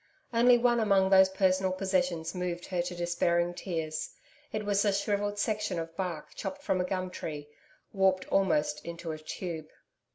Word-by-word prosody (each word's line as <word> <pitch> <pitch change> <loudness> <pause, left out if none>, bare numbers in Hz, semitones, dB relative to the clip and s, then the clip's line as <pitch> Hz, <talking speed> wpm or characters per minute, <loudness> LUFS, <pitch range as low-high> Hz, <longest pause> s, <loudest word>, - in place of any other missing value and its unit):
Only 240 +1 +6
one 240 0 +3
among 195 -3 +3
those 190 0 +7
personal 190 0 +2
possessions 180 -3 0
moved 180 -1 -3
her 180 -2 -1
to 175 +1 -4
despairing 175 0 +1
tears. 160 -4 -3 0.4
It 215 -1 -3
was 205 -1 +2
a 205 - +3
shrivelled 205 +1 -1
section 210 -3 -1
of 165 0 -5
bark 175 -4 -4
chopped 285 0 -6
from 185 -11 +1
a - - 0
gum 185 -1 -2
tree, 150 -4 -6 0.5
warped 190 -1 +2
almost 150 -6 +1
into 170 -1 -6
a 155 - -6
tube. 160 0 -6
185 Hz, 165 wpm, -30 LUFS, 170-200 Hz, 0.5 s, those